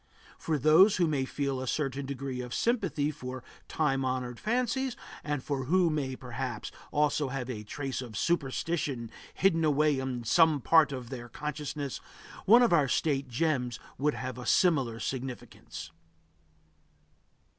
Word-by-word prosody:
For 160 -2 0
those 155 - +6
who 175 - +3
may 145 -4 0
feel 135 -1 -2
a 130 - -4
certain 135 -1 -2
degree 135 -2 -4
of 125 -1 -5
sympathy 190 -11 0
for 130 -2 -7 0.2
time 135 -4 0
honored 130 -2 -2
fancies, 250 +3 0 0.3
and 145 -3 -2
who 155 +5 +1
may 135 -4 -2
perhaps 125 -2 -5 0.2
also 150 -1 +1
have 130 -1 -4
a 110 -4 -5
trace 135 +4 -4
of 115 -4 -7
superstition 140 -5 -1 0.2
hidden 165 -4 +3
away 150 -2 +3
in 130 -2 -3
some 160 +5 +4
part 160 +3 +5
of 130 -2 -6
their 120 -2 -7
consciousness, 150 0 -4 0.4
one 235 +5 +7
of 235 - +3
our 150 -5 +4
State 140 0 0
gems 125 -2 -1 0.2
would 150 +2 +1
have 130 -1 -5
a 125 - -7
similar 135 -11 +3
significance. 125 -10 -6
140 Hz, 145 wpm, -30 LUFS, 125-155 Hz, 0.4 s, one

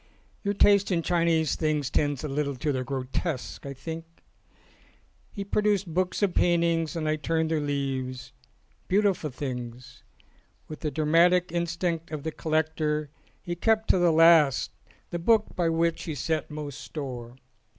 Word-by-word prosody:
Your 200 -1 0
taste 200 0 +4
in 170 -3 0
Chinese 165 -3 +2
things 150 -4 -1
tends 145 -2 0
a - - -2
little 140 0 -2
to 145 +4 -1
the 130 -2 -1
grotesque,' 135 +2 -4
I 140 - -6
think." 160 +4 -6 1.3
He 200 - -6
produced 200 -3 0
books 185 +3 0
of 195 -3 +2
paintings 170 -1 +2
and 160 -2 -2
I 155 0 +1
turned 160 +1 -1
their 160 - +1
leaves. 135 -3 -3 0.5
Beautiful 195 -5 +2
things! 125 -2 -7 0.7
With 155 - -8
the 155 - -2
dra 150 +2 -2
matic 175 +3 +4
instinct 170 -1 -2
of 155 -3 -5
the 160 - -2
collector 155 -2 -1 0.3
he 175 - -3
kept 220 +4 +2
to 185 - +2
the 175 -1 +4
last 160 -4 +5 0.4
the 175 - -2
book 215 +4 +2
by 170 -2 +1
which 165 0 0
he 160 - -4
set 155 +3 -2
most 150 -3 -6
store. 125 -5 -6
160 Hz, 155 wpm, -27 LUFS, 145-170 Hz, 1.3 s, last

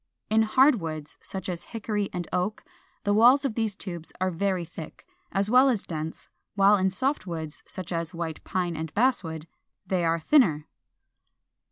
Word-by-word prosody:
In 220 +1 +5
hard 255 +2 +4
woods, 155 -2 -6
such 190 -2 -6
as 175 -2 -3
Hickory 210 -2 -3
and 175 -2 -4
Oak, 185 +4 -1 0.4
the 205 - +2
walls 245 +6 +6
of 265 - 0
these 220 -3 -1
tubes 175 -5 -7
are 185 0 +1
very 185 0 -1
thick, 160 -1 -10 0.3
as 195 +1 +1
well 255 +4 +6
as 230 -6 0
dense; 160 -1 -5 0.3
while 200 +1 +6
in 190 -1 +2
soft 255 +4 -1
woods, 160 -3 -5
such 185 -2 -7
as 165 -1 -1
White 165 -3 -5
Pine 175 -2 -2
and 160 -1 -4
Basswood, 185 -10 +1 0.4
they 185 -2 0
are 165 0 +2
thinner. 160 - +3
185 Hz, 170 wpm, -27 LUFS, 165-215 Hz, 0.4 s, walls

